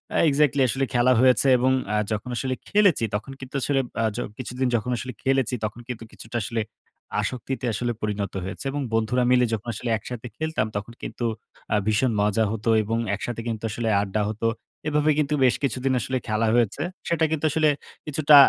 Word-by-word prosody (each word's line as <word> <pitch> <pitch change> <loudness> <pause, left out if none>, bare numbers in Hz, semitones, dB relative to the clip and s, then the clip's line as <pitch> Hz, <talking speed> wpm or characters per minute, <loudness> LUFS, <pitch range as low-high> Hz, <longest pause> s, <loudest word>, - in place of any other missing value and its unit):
আ - - +3
exactly 145 -1 +3
আসলে 135 +3 +1
খেলা 120 +1 +4
হয়েছে 130 +1 +5
এবং 130 +2 +3 0.2
আ - - +2 0.2
যখন 110 +3 -2
আসলে 130 0 -1
খেলেছি 200 - +4
তখন 110 +6 -4
কিন্তু 130 +1 -9
আসলে 140 +1 +1 0.2
আ - - +2
যো 120 - -2 0.2
কিছুদিন 130 +1 -2
যখন 120 +2 -1
আসলে 125 +2 -5
খেলেছি 135 -2 +2
তখন 110 +2 -5
কিন্তু 120 -2 -5
কিছুটা 115 +2 -6
আসলে 115 +2 -1 0.6
আসক্তিতে 130 0 -3
আসলে 120 +4 -1
পরিণত 105 -2 -2
হয়েছে 95 +8 -6
এবং 145 +1 -2
বন্ধুরা 115 +3 +2
মিলে 125 -1 +5
যখন 110 +1 -3
আসলে 115 +3 -4
একসাথে 120 +2 -7
খেলতাম। 160 -8 0
তখন 105 +3 -4
কিন্তু 120 - -4 0.5
আ - - +4
ভীষণ 110 +4 +3
মজা 105 +2 +2
হত 110 -1 -5 0.2
এবং 115 +2 -1 0.2
একসাথে 115 +3 -4
কিন্তু 115 -2 -3
আসলে 115 +1 -1
আড্ডা 100 +1 -1
হত। 110 +1 -6 0.4
এভাবে 150 0 +3
কিন্তু 150 0 +1
বেশ 125 - +4
কিছুদিন 130 0 +1
আসলে 130 +2 -1
খেলা 110 +1 +1
হয়েছে। 120 +2 +2 0.3
সেটা 170 -1 +1
কিন্তু 160 -1 0
আসলে 155 +1 +3 0.4
কিছুটা 150 0 +5
125 Hz, 185 wpm, -25 LUFS, 110-135 Hz, 0.6 s, হয়েছে